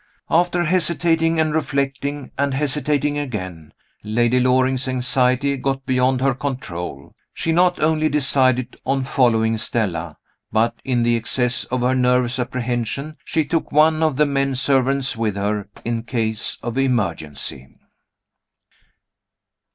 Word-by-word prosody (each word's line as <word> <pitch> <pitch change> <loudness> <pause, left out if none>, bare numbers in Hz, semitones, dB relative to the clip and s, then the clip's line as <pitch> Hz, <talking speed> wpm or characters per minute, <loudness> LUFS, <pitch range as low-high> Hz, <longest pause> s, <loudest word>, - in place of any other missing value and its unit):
After 175 +1 +2
hesitating 165 -1 +1
and 155 -1 +1
reflecting, 140 -2 -2
and 140 -1 0
hesitating 145 +1 0
again, 95 - -6 0.3
Lady 120 +3 +2
Loring's 130 +1 +2
anxiety 130 +2 +1
got 135 0 -2
beyond 130 0 +1
her 135 0 +2
control. 90 - -5 0.2
She 165 - -1
not 180 +2 +3
only 155 0 +2
decided 130 -3 +2
on 135 0 0
following 115 -4 +2
Stella, 85 -9 -2 0.3
but, 115 +2 +2
in 125 -3 0
the 120 0 +3
excess 125 +2 0
of 125 0 -2
her 125 +1 +2
nervous 125 0 +2
apprehension, 125 +4 -3
she 160 -2 0
took 160 +3 -2
one 155 +1 +4
of 155 -3 +2
the 150 +3 +3
men 135 -1 0
servants 135 0 +1
with 110 -3 -1
her, 100 0 -2 0.2
in 115 -1 -1
case 115 -2 -2
of 120 +2 -2
emergency! 85 - -2
130 Hz, 130 wpm, -21 LUFS, 120-145 Hz, 0.3 s, one